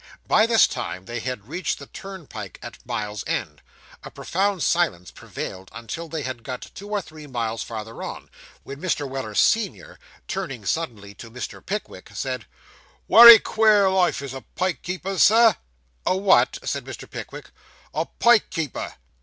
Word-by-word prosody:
By 215 Hz, -, +4 dB
this 230 Hz, -1 st, +6 dB
time 95 Hz, -7 st, -5 dB
they 120 Hz, +1 st, -5 dB
had 125 Hz, -3 st, -5 dB
reached 175 Hz, +5 st, -2 dB
the 140 Hz, -, -10 dB
turnpike 150 Hz, -, -9 dB
at -, -, -10 dB
Mile 105 Hz, 0 st, -3 dB
End; -, -, -3 dB, 0.4 s
a -, -, -8 dB
profound 195 Hz, 0 st, -1 dB
silence 130 Hz, -, 0 dB
prevailed 95 Hz, 0 st, -8 dB
until 115 Hz, +9 st, -6 dB
they 160 Hz, -2 st, -4 dB
had 130 Hz, -2 st, -5 dB
got 125 Hz, +2 st, -7 dB
two 200 Hz, +2 st, -10 dB
or 205 Hz, -2 st, -1 dB
three 155 Hz, -2 st, -12 dB
miles 115 Hz, -4 st, -3 dB
farther 110 Hz, 0 st, -7 dB
on, -, -, -7 dB, 0.3 s
when 140 Hz, +2 st, -9 dB
Mr. 160 Hz, -6 st, -1 dB
Weller, 130 Hz, -6 st, -5 dB
senior, 230 Hz, -, +1 dB, 0.3 s
turning 135 Hz, -, -5 dB
suddenly 105 Hz, -7 st, -3 dB
to 115 Hz, +3 st, -11 dB
Mr. 120 Hz, 0 st, -7 dB
Pickwick, 210 Hz, +2 st, -6 dB
said -, -, -4 dB, 0.6 s
'Wery 235 Hz, 0 st, +12 dB
queer 210 Hz, -4 st, +3 dB
life 180 Hz, -6 st, +1 dB
is 135 Hz, -2 st, -6 dB
a 135 Hz, -, -7 dB
pike 185 Hz, -1 st, -1 dB
keeper's, 185 Hz, +1 st, -3 dB
sir.' 225 Hz, -1 st, +6 dB, 0.5 s
'A 185 Hz, -, +2 dB
what?' 195 Hz, 0 st, +4 dB
said -, -, -3 dB
Mr. -, -, -9 dB
Pickwick. -, -, -9 dB, 0.4 s
'A -, -, -1 dB
pike 235 Hz, -2 st, +5 dB
keeper. 160 Hz, -6 st, -4 dB
155 Hz, 160 wpm, -23 LUFS, 115-195 Hz, 0.6 s, Wery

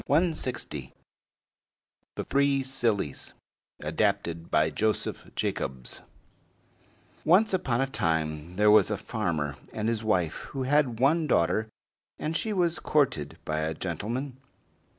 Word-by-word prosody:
THE 130 Hz, -, 0 dB, 1.4 s
THREE 140 Hz, -1 st, +2 dB
SILLIES 115 Hz, -, -1 dB, 0.5 s
ADAPTED 85 Hz, 0 st, 0 dB
BY 75 Hz, +1 st, +3 dB
JOSEPH 110 Hz, +7 st, -2 dB
JACOBS 65 Hz, -2 st, -3 dB, 1.2 s
Once 195 Hz, +6 st, +4 dB
upon 135 Hz, -10 st, +1 dB
a -, -, +3 dB
time 80 Hz, -, -1 dB
there 105 Hz, +2 st, +5 dB
was 105 Hz, -3 st, +6 dB
a -, -, -1 dB
farmer 75 Hz, -4 st, -2 dB
and 110 Hz, 0 st, -2 dB
his 115 Hz, -1 st, 0 dB
wife 90 Hz, -7 st, +1 dB, 0.2 s
who 130 Hz, -, 0 dB
had 130 Hz, -4 st, +2 dB
one 155 Hz, +5 st, +3 dB
daughter, 110 Hz, -, +2 dB, 0.5 s
and 155 Hz, +2 st, -3 dB
she 220 Hz, -, -1 dB
was 175 Hz, -4 st, +1 dB
courted 110 Hz, -, +1 dB
by 75 Hz, 0 st, -1 dB
a 80 Hz, +1 st, -1 dB
gentleman. 115 Hz, -, -4 dB
110 Hz, 115 wpm, -28 LUFS, -, 1.4 s, was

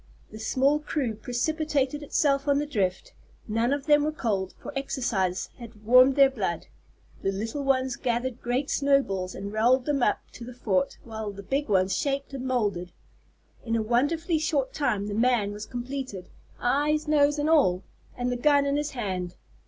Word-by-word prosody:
The 215 Hz, -, -9 dB
small 270 Hz, +6 st, +2 dB
crew 290 Hz, -6 st, -2 dB
precipitated 285 Hz, +5 st, -1 dB
itself 280 Hz, -1 st, +1 dB
on 285 Hz, -1 st, +3 dB
the 295 Hz, -, 0 dB
drift. 195 Hz, -10 st, -2 dB, 0.3 s
None 230 Hz, +3 st, +1 dB
of 285 Hz, -1 st, -1 dB
them 295 Hz, -1 st, +5 dB
were 305 Hz, -, 0 dB
cold, 205 Hz, -10 st, -2 dB
for -, -, -9 dB
exercise 230 Hz, -9 st, -1 dB
had 225 Hz, -3 st, -12 dB
warmed 255 Hz, +3 st, +6 dB
their 275 Hz, -1 st, +7 dB
blood. 190 Hz, -9 st, -3 dB, 0.6 s
The 195 Hz, -, 0 dB
little 225 Hz, +8 st, -4 dB
ones 260 Hz, -2 st, +1 dB
gathered 245 Hz, 0 st, -2 dB
great 250 Hz, +4 st, -1 dB
snowballs 265 Hz, -10 st, +1 dB
and 200 Hz, +1 st, -6 dB
rolled 245 Hz, +4 st, +3 dB
them 290 Hz, -3 st, 0 dB
up 210 Hz, -, +2 dB
to 235 Hz, -, -10 dB
the 245 Hz, +1 st, -9 dB
fort, 190 Hz, -6 st, 0 dB
while 220 Hz, -2 st, -5 dB
the 200 Hz, 0 st, -10 dB
big 275 Hz, +5 st, -2 dB
ones 190 Hz, -1 st, +2 dB
shaped 280 Hz, 0 st, -2 dB
and 260 Hz, -1 st, -4 dB
moulded. 205 Hz, -8 st, -1 dB, 0.7 s
In 230 Hz, -1 st, -1 dB
a 225 Hz, -, +1 dB
wonderfully 310 Hz, -, +1 dB
short 290 Hz, -4 st, 0 dB
time 225 Hz, -9 st, 0 dB
the 205 Hz, -, -4 dB
"man" 230 Hz, -2 st, +2 dB
was 210 Hz, +1 st, -7 dB
completed, 250 Hz, -6 st, -6 dB, 0.3 s
eyes, 295 Hz, +5 st, +1 dB
nose, 295 Hz, -1 st, +3 dB
and 295 Hz, +1 st, 0 dB
all, 195 Hz, -, +3 dB, 0.3 s
and 250 Hz, 0 st, -1 dB
the 245 Hz, -, -1 dB
gun 285 Hz, +2 st, +4 dB
in 280 Hz, 0 st, +1 dB
his 295 Hz, 0 st, -1 dB
hand. 180 Hz, -5 st, -3 dB
250 Hz, 175 wpm, -26 LUFS, 210-280 Hz, 0.7 s, their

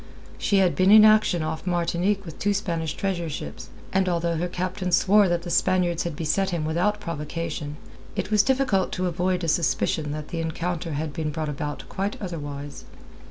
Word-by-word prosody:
She 200 Hz, -, +2 dB
had 190 Hz, -2 st, +3 dB
been 185 Hz, +1 st, +3 dB
in 215 Hz, +1 st, +9 dB
action 215 Hz, -6 st, +4 dB
off 160 Hz, +3 st, -4 dB
Martinique 175 Hz, +3 st, 0 dB
with 165 Hz, -, -9 dB
two 205 Hz, 0 st, +1 dB
Spanish 170 Hz, -6 st, -2 dB
treasure 180 Hz, -4 st, -2 dB
ships, 75 Hz, -, -7 dB, 0.2 s
and 190 Hz, -1 st, +2 dB
although 170 Hz, -1 st, 0 dB
her 175 Hz, +2 st, -1 dB
captain 185 Hz, +1 st, -3 dB
swore 200 Hz, +2 st, +5 dB
that 175 Hz, 0 st, 0 dB
the 175 Hz, -, -5 dB
Spaniards 175 Hz, -1 st, +2 dB
had 170 Hz, -3 st, -3 dB
beset 170 Hz, +5 st, 0 dB
him 170 Hz, -4 st, -2 dB
without 180 Hz, +7 st, +1 dB
provocation, 155 Hz, -3 st, -4 dB, 0.4 s
it 205 Hz, -, -3 dB
is 210 Hz, -, +6 dB
difficult 255 Hz, -6 st, +1 dB
to 185 Hz, -, -1 dB
avoid 180 Hz, +1 st, 0 dB
a -, -, -1 dB
suspicion 155 Hz, -1 st, +1 dB
that 150 Hz, 0 st, -5 dB
the 165 Hz, -, -3 dB
encounter 165 Hz, 0 st, -3 dB
had 150 Hz, 0 st, -3 dB
been 155 Hz, 0 st, -2 dB
brought 155 Hz, 0 st, -3 dB
about 145 Hz, 0 st, -4 dB
quite 195 Hz, +2 st, -3 dB
otherwise. 145 Hz, -6 st, -6 dB
175 Hz, 185 wpm, -25 LUFS, 160-190 Hz, 0.4 s, in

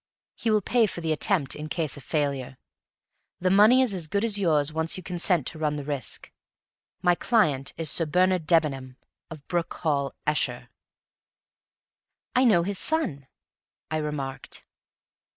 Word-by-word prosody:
He 230 Hz, -, -3 dB
will 215 Hz, -1 st, +3 dB
pay 235 Hz, +1 st, +3 dB
for 180 Hz, -, -6 dB
the 165 Hz, -2 st, -2 dB
attempt, 155 Hz, -3 st, +1 dB
in 155 Hz, +1 st, -7 dB
case 160 Hz, -2 st, -1 dB
of 140 Hz, -, -11 dB
failure; 140 Hz, -4 st, -2 dB, 0.8 s
the 185 Hz, +1 st, +1 dB
money 215 Hz, +7 st, +6 dB
is 240 Hz, -6 st, 0 dB
as 175 Hz, -4 st, -4 dB
good 200 Hz, +7 st, 0 dB
as 210 Hz, -3 st, +2 dB
yours 155 Hz, -5 st, +2 dB
once 160 Hz, +2 st, -1 dB
you 185 Hz, -, -8 dB
consent 175 Hz, -4 st, 0 dB
to 160 Hz, -, -5 dB
run 150 Hz, -1 st, 0 dB
the 145 Hz, -, -4 dB
risk. 140 Hz, -2 st, -5 dB, 0.7 s
My 180 Hz, -1 st, +5 dB
client 160 Hz, -, +1 dB
is 160 Hz, -3 st, +2 dB
Sir 165 Hz, 0 st, +2 dB
Bernard 180 Hz, 0 st, +2 dB
Debenham, 135 Hz, -6 st, +1 dB, 0.3 s
of 155 Hz, -3 st, -11 dB
Broom 175 Hz, -2 st, 0 dB
Hall, 140 Hz, -4 st, -1 dB
Esher." 125 Hz, -5 st, -1 dB, 1.7 s
"I 255 Hz, +1 st, +4 dB
know 185 Hz, -8 st, +5 dB
his 195 Hz, +1 st, -3 dB
son," 155 Hz, -, -1 dB, 0.6 s
I 155 Hz, -, 0 dB
remarked. 140 Hz, -3 st, -4 dB
160 Hz, 155 wpm, -26 LUFS, 145-185 Hz, 1.7 s, money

